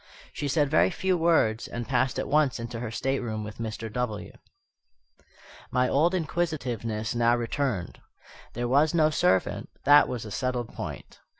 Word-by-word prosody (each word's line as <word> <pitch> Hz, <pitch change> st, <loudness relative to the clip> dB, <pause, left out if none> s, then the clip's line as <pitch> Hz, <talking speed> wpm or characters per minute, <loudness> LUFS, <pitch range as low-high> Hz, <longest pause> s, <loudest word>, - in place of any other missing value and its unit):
She 145 Hz, -, -3 dB
said 145 Hz, +1 st, +2 dB
very 90 Hz, -7 st, +4 dB
few 190 Hz, -, 0 dB
words, 160 Hz, -10 st, +2 dB
and 120 Hz, -1 st, -5 dB
passed 130 Hz, 0 st, +1 dB
at -, -, -2 dB
once 145 Hz, -4 st, +2 dB
into 115 Hz, 0 st, -5 dB
her 120 Hz, -1 st, -4 dB
stateroom 115 Hz, -3 st, -2 dB
with 105 Hz, +1 st, -9 dB
Mr. 110 Hz, -1 st, -5 dB
W. 125 Hz, -4 st, -3 dB, 1.4 s
My 125 Hz, 0 st, +2 dB
old 170 Hz, +6 st, +2 dB
inquisitiveness 125 Hz, -, -2 dB
now 120 Hz, 0 st, +3 dB
returned. 120 Hz, -4 st, -2 dB, 0.5 s
There 120 Hz, +1 st, -2 dB
was 145 Hz, +6 st, +3 dB
no 155 Hz, -2 st, +4 dB
servant, 95 Hz, -9 st, +1 dB
that 145 Hz, +1 st, +7 dB
was 120 Hz, -3 st, -4 dB
a 105 Hz, -, -8 dB
settled 125 Hz, 0 st, -2 dB
point. -, -, -7 dB
125 Hz, 155 wpm, -27 LUFS, 115-145 Hz, 1.4 s, that